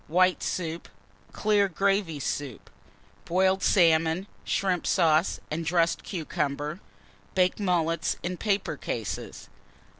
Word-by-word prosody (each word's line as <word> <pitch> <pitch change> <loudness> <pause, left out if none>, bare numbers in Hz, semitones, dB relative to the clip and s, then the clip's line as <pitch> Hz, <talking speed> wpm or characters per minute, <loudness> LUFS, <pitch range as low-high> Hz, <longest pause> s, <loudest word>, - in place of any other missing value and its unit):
White 185 +2 +3
Soup. 165 -2 -3 0.4
Clear 205 -2 +2
Gravy 195 -3 0
Soup. 140 -2 -4 0.5
Boiled 190 +2 +2
Salmon, 165 -1 +3 0.2
Shrimp 185 -3 0
Sauce, 165 -1 +3
and 160 +2 -2
dressed 170 +1 +1
Cucumber. 150 -2 -3 0.6
Baked 185 +1 +2
Mullets 170 -4 0
in 180 +1 -3
paper 200 -7 -1
cases. 110 -9 -5
170 Hz, 100 wpm, -27 LUFS, 160-190 Hz, 0.6 s, White